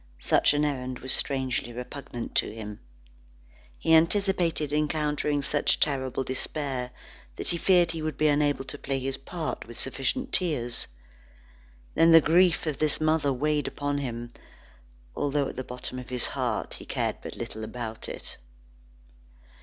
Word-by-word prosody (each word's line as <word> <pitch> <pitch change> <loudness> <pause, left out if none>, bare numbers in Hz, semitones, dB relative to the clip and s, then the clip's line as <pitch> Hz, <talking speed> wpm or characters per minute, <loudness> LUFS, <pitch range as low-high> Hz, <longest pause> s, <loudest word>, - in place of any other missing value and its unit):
Such - - +4
an 150 +1 +2
errand 130 -3 -2
was 130 +1 +2
strangely 130 -3 +1
repugnant 125 0 -6
to - - +3
him. 105 -2 -7 1.0
He 160 - +2
anticipated 165 -3 +3
encountering 150 -1 0
such 145 +1 +2
terrible 135 -3 0
despair 130 0 -2 0.5
that - - -2
he 170 - +2
feared 175 -2 +4
he 165 -1 -5
would 155 -2 -3
be 155 - +3
unable 145 -2 +2
to 135 - -6
play 135 0 -2
his 135 0 -2
part 160 0 -5
with 120 - -9
sufficient 135 - -1
tears. 135 -10 +1 1.1
Then 165 - +5
the 165 0 +10
grief 170 +3 +4
of 150 -4 -2
this 155 -1 +2
mother 155 -2 +2
weighed 150 +2 0
upon 145 0 -2
him, 120 -3 -5 0.8
although 145 -1 0
at - - -8
the 130 - -3
bottom 125 +1 -6
of 125 - -9
his 125 -2 -1
heart, - - -2
he - - -10
cared - - -1
but - - -7
little 110 - -6
about 115 0 -6
it. - - -6
145 Hz, 155 wpm, -27 LUFS, 130-155 Hz, 1.1 s, the